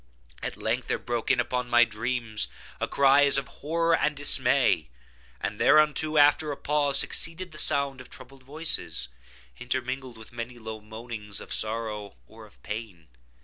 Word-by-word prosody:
At - - -4
length - - -2
there - - 0
broke 120 -2 -3
in 130 - +3
upon 125 0 -1
my 120 0 +6
dreams 115 -1 -2 0.3
a - - -1
cry 140 +1 +5
as 140 - +4
of 140 -1 -2
horror 165 +3 +2
and 150 -1 0
dismay; 130 - +3 0.5
and - - -4
thereunto, 155 0 +4
after 150 +1 +5
a 140 - -5
pause, 145 -1 +1
succeeded 175 +2 +1
the 155 - -8
sound 140 -3 +1
of 125 - -13
troubled 130 +1 -12
voices, 140 - -2 0.5
intermingled 130 0 -4
with 110 -1 -13
many 120 +1 -6
low 110 -1 -7
moanings 110 -1 -5
of - - -6
sorrow 110 -2 -2
or - - -14
of - - -25
pain. 105 - -7
125 Hz, 160 wpm, -27 LUFS, 110-145 Hz, 0.5 s, my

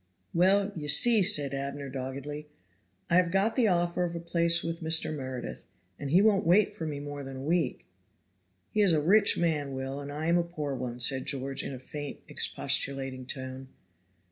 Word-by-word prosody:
"Well, 195 +3 +3
ye 150 -3 -6
see," 225 +9 +5
said 150 -8 +4
Abner, 140 +1 -4
doggedly, 140 +3 -6 0.6
"I 170 - +3
have 180 -2 +3
got 195 +5 +1
the 245 -4 +3
offer 175 -1 +1
of 170 -1 -3
a - - -3
place 170 0 +3
with 165 0 -4
Mr. 160 -1 +3
Meredith, 130 -3 -7 0.3
and 140 - -5
he 180 +7 +4
won't 210 -3 +3
wait 190 +4 +4
for 160 - -5
me 145 -2 -4
more 145 0 -7
than 135 0 -8
a 130 - -7
week." 160 -3 -1 0.9
"He 215 - +1
is 195 -5 +4
a 155 - +3
rich 200 +7 +4
man, 150 -5 -1
Will, 135 +1 -5
and 145 0 -7
I 150 +2 -5
am 170 +1 +3
a - - +1
poor 155 -5 -5
one," 125 -2 -5
said 130 +2 +3
George 135 0 -3
in - - -6
a 130 - -6
faint, 145 +3 -8
expostulating 135 -2 -1
tone. 130 -1 -7
150 Hz, 195 wpm, -28 LUFS, 135-175 Hz, 0.9 s, see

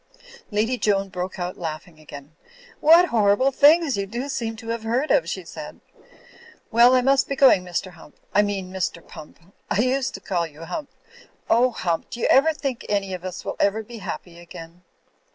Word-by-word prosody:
Lady 225 +4 0
Joan 195 -2 +1
broke 185 0 -5
out 180 0 -5
laughing 160 0 -7
again. 145 0 -12 0.4
"What 335 +3 +6
hor 205 -3 +3
rible 270 +3 +1
things 295 -2 +5
you 200 0 -2
do 240 +7 -5
seem 225 -4 -3
to 225 +1 -10
have 230 0 -2
heard 240 +7 -1
of," - - +2
she - - -4
said. - - -10 0.9
"Well, 240 +2 +6
I 255 - +4
must 270 +1 +2
be 275 - -1
going, 265 -9 +5
Mr. 180 +1 -4
Hump 165 -3 -17
— - - -37
I 205 - +5
mean 195 -3 -3
Mr. 185 -2 -3
Pump^I 170 +6 -8
used 260 +1 -1
to - - -7
call 175 -3 -2
you 160 +1 -12
Hump... 280 - -6 0.6
oh, 245 +3 +4
Hump, 175 -8 -3
do 240 - -7
you - - +1 0.3
think 270 -5 -4
any 200 -2 -1
of 180 -1 -6
us 185 -1 -7
will - - -4
ever 210 +2 +1
be 230 +1 -10
happy 175 -2 -7
again?" 170 0 -12
205 Hz, 190 wpm, -23 LUFS, 180-250 Hz, 0.9 s, What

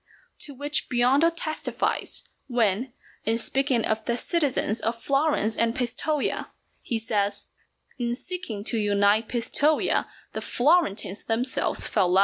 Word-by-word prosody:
To 285 - -5
which 290 +3 -1
Biondo 255 +6 +4
testifies, 310 -2 -1 0.2
when, 240 -1 +1 0.3
in 225 +1 +1
speaking 260 0 +1
of 220 0 0
the 235 0 0
citizens 280 - 0
of 230 +1 -2
Florence 275 -5 +1
and 230 0 +1
Pistoja, 275 +4 -1 0.3
he 235 - -2
says, 205 -2 -1 0.5
"In 240 0 0
seeking 300 - -5
to 225 +1 +1
unite 205 +1 +3
Pistoja 285 +6 +1 0.3
the - - -3
Florentines 245 - +2
themselves 240 +3 0
fell 180 0 +2
out." - - +8
240 Hz, 130 wpm, -26 LUFS, 220-280 Hz, 0.5 s, out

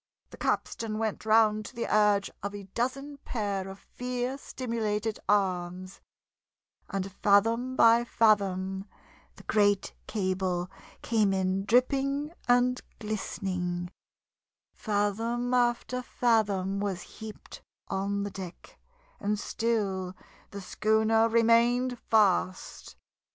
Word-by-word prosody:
The - - -11
capstan 220 -2 -2
went 220 -1 -3
round 215 -1 +4
to - - -10
the 235 - -2
urge 210 -1 +3
of 200 +1 -4
a 200 - -7
dozen 260 +8 -3
pair 200 -7 -3
of 195 - -9
fear 250 +3 -4
stimulated 225 -5 -3
arms; 185 -2 0 0.9
and 195 -1 -3
fathom 225 +6 +2
by 230 -1 +6
fathom 195 -4 +1 0.5
the - - -14
great 205 -2 +2
cable 185 -3 -1 0.3
came 215 -4 +2
in 190 +1 0
dripping 275 +5 +1
and 245 +1 +3 0.2
glistening; 185 -4 -3 0.8
fathom 225 +4 -1
after 245 +1 +1
fathom 205 -6 +1
was 195 -3 -2
heaped 220 -1 -10 0.3
on 200 +1 -1
the 205 - -4
deck, 185 -2 -10 0.4
and 210 +1 0
still 200 -5 -1 0.3
the 200 - -7
schooner 220 +3 +2
remained 235 +2 +3
fast. 190 -4 +1
210 Hz, 105 wpm, -29 LUFS, 195-235 Hz, 0.9 s, by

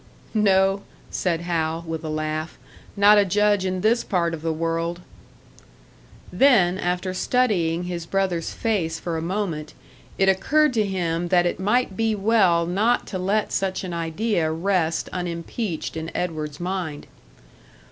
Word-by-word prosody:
"No," 195 -2 +3 0.3
said 170 -3 -1
Hal, 165 -1 -1
with 165 -1 -5
a 155 - -4
laugh 155 +1 -3 0.4
"not 205 +1 +7
a - - +5
judge 205 0 +2
in 185 -1 -2
this 230 +4 +2
part 170 -3 0
of 160 - -5
the 165 0 -1
world!" 165 +2 -2 1.3
Then, 195 -10 +4
after 180 +1 -1
studying 185 -7 +1
his 175 -2 -5
brother's 190 -4 -1
face 175 -8 -1
for 170 -2 -3
a 160 - -2
moment, 170 -3 -3 0.4
it 195 - +3
occurred 290 +10 +3
to 220 -3 +2
him 175 -3 -1
that 175 0 +3
it 175 - -1
might 210 +1 +1
be 225 +1 +1
well 195 -5 +3
not 210 +8 +1
to 185 - -2
let 200 +4 0
such 190 -1 -1
an 180 -2 -5
idea 170 +1 -1
rest 165 -1 0
unimpeached 175 +1 -4
in 160 0 -4
Edward's 155 -4 -3
mind. 175 -4 -4
180 Hz, 145 wpm, -23 LUFS, 165-200 Hz, 1.3 s, not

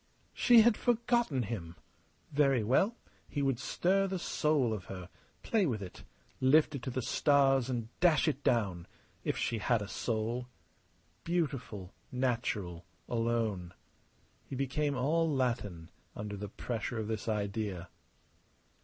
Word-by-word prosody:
She 240 -2 +7
had 225 -1 +4
forgotten 235 - +1
him! 95 -7 -5 0.6
Very 140 -5 +3
well. 185 - +3 0.3
He 145 - -1
would 135 -3 +1
stir 195 +7 +1
the 190 0 -2
soul 150 -8 +1
of 100 -5 -5
her, 90 -2 -8 0.3
play 215 -5 +2
with 110 -7 -2
it, 90 - -10 0.4
lift 150 +4 +4
it 140 - -4
to 130 - -4
the 130 0 -2
stars 135 -1 +3
and 120 -3 -2
dash 170 -2 +4
it 145 -2 -1
down 100 -9 +1 0.4
if - - -1
she 115 - -1
had 120 +1 +2
a 100 - -5
soul. 115 +3 -2 0.8
Beautiful, 135 - -2 0.2
natural, 115 -9 -1 0.2
alone. 115 -7 -1 0.7
He - - -7
became 140 +2 0
all 160 +5 +2
Latin 115 - -1 0.2
under 105 0 -5
the 100 0 -6
pressure 115 +2 -4
of 110 -1 -2
this 110 0 -3
idea. 100 -3 -2
125 Hz, 135 wpm, -32 LUFS, 105-145 Hz, 0.8 s, She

